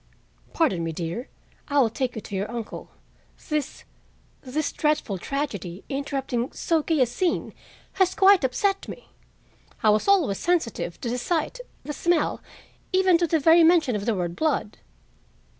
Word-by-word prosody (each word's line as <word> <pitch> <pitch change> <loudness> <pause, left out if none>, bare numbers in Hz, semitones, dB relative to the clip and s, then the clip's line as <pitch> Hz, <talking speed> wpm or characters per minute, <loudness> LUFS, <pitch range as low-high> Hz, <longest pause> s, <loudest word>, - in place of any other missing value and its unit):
"Pardon 190 - +1
me, 165 - -2
dear, 170 - -5 0.4
I 285 - -1
will 245 -6 +4
take 245 +2 -2
you 220 - -5
to 200 - -7
your 195 +2 -2
uncle. 235 -2 -6 0.6
This—this 300 -1 -5
dreadful 300 - 0
tragedy, 200 - -4
interrupting 270 -3 -2
so 325 -2 +1
gay 310 -2 0
a - - +6
scene, 335 +9 -1 0.5
has 375 0 +3
quite 390 -3 +6
upset 390 +10 0
me. - - -10 0.7
I 215 - +6
was 215 - +1
always 340 - +3
sensitive 315 - -1
to 240 - -3
the 250 - -2
sight, 345 - -1 0.2
the 295 - -5
smell, 340 0 0 0.5
even 370 -2 +4
to 345 - +2
the 320 0 +2
very 330 +3 +6
mention 320 -7 +4
of 205 +1 -4
the 230 - +2
word 175 -2 -3
blood." 300 -9 -1
275 Hz, 155 wpm, -25 LUFS, 220-335 Hz, 0.7 s, a